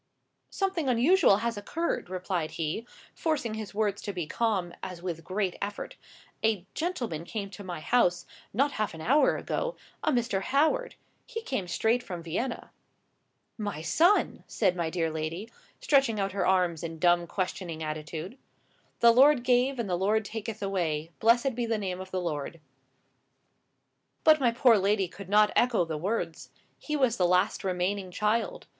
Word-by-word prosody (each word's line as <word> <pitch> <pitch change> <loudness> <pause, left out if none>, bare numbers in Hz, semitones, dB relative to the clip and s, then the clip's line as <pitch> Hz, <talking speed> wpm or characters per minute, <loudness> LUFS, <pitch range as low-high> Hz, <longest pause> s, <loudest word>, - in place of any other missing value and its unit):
"Something 380 -8 -1
unusual 250 - +5
has 235 -2 -1
occurred," 320 - -2
replied 180 -3 -2
he, 165 +9 -3 0.3
forcing 295 -9 -1
his 215 -2 -6
words 205 -2 0
to 205 - -4
be 180 -4 -3
calm, 190 -2 -1
as 180 -2 -6
with 175 -2 -4
a - - -13
great 185 +2 -2
effort. 205 0 -5 0.5
"A 215 -5 +1
gentleman 250 - -3
came 200 +2 -5
to 200 +1 -9
my 175 -4 -6
house, 180 -5 +2 0.3
not 275 +7 +2
half 215 -8 -2
an 160 - -9
hour 280 - +3
ago—a - - -3
Mr. 235 -6 0
Howard. 315 - +1 0.3
He 455 -2 -5
came 235 - -3
straight 225 +7 +1
from 180 -8 -7
Vienna." 210 +10 -3 0.9
"My 205 -7 -4
son!" 345 - +3
said 190 -5 +1
my 170 -2 -1
dear 165 -1 -1
lady, 160 +8 -4 0.3
stretching 270 -7 +3
out 195 0 0
her 190 -1 0
arms 180 -4 +2
in 165 -1 -5
dumb 175 +1 +3
questioning 180 -3 -3
attitude. 155 - -5 0.6
"The 235 - +8
Lord 265 +2 +6
gave 250 +2 +2
and 235 -3 -2
the 180 - 0
Lord 215 +3 +2
taketh 220 0 -5
away. 165 -5 -1
Blessed 240 +4 +4
be 235 0 -2
the 225 -1 0
name 185 -3 -3
of 190 - -8
the 185 - -2
Lord." 165 -1 -4 1.6
But 310 -1 +6
my 250 -3 +3
poor 235 -2 +5
lady 195 0 +2
could 190 +1 -11
not 210 +1 +5
echo 235 -8 +3
the 160 -1 -4
words. 195 +9 -3 0.3
He 300 - -3
was 260 -5 +2
the 180 - +3
last 180 +1 +2
remaining 185 +1 -1
child. 225 - -1
205 Hz, 165 wpm, -28 LUFS, 175-240 Hz, 1.6 s, The